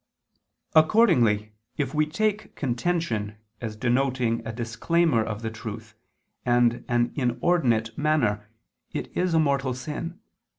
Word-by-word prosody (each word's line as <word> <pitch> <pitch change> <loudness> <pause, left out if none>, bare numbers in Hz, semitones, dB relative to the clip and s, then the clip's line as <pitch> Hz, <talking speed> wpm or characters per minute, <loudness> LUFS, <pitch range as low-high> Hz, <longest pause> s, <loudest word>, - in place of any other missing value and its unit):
Accordingly 125 - +4 0.3
if 140 -3 -1
we 155 0 +2
take 210 +6 -1
contention 120 -6 -1 0.2
as 110 -3 -4
denoting 125 0 +1
a - - -2
disclaimer 120 +4 +1
of 110 0 -5
the 110 - -2
truth 110 0 -8 0.5
and 120 -1 +2
an 120 0 +1
inordinate 120 -4 +1
manner, 120 -9 +1 0.4
it - - -5
is 180 -2 +1
a - - +5
mortal 140 -4 +1
sin. 155 +7 -6
125 Hz, 120 wpm, -26 LUFS, 115-155 Hz, 0.5 s, a